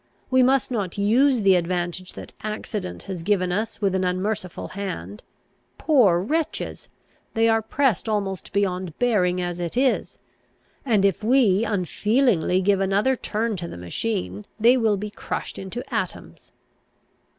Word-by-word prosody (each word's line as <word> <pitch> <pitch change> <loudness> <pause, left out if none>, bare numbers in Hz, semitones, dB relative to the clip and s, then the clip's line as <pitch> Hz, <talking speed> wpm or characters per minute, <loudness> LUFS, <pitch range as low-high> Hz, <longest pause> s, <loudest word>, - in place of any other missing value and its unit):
We 260 0 +5
must 260 0 +3
not 205 -7 -2
use 235 +4 +3
the 195 -1 +6
advantage 175 +1 -1
that - - -10
accident 210 -3 -5
has 190 -4 -6
given 185 0 +1
us 215 +4 -3
with 195 -2 +1
an 190 0 0
unmerciful 185 0 -2
hand. 105 - -6 0.6
Poor 230 - +4
wretches! 305 - -3 0.5
they 225 0 +3
are 225 0 +3
pressed 230 -2 0
almost 200 -3 -2
beyond 185 -4 -1
bearing 185 -7 +2
as 175 -1 -3
it 175 +5 -4
is; 260 0 +1 0.7
and, 210 -5 +3
if 195 +1 +1
we 225 -4 +4
unfeelingly 205 - +1
give 195 +1 +2
another 200 +7 +2
turn 225 -1 -2
to 170 -1 -5
the - - -8
machine, 200 - -3
they 235 +4 +6
will 220 -5 +2
be 210 +1 -5
crushed - - -5
into 195 +6 -6
atoms." - - -5
200 Hz, 145 wpm, -24 LUFS, 180-225 Hz, 0.7 s, the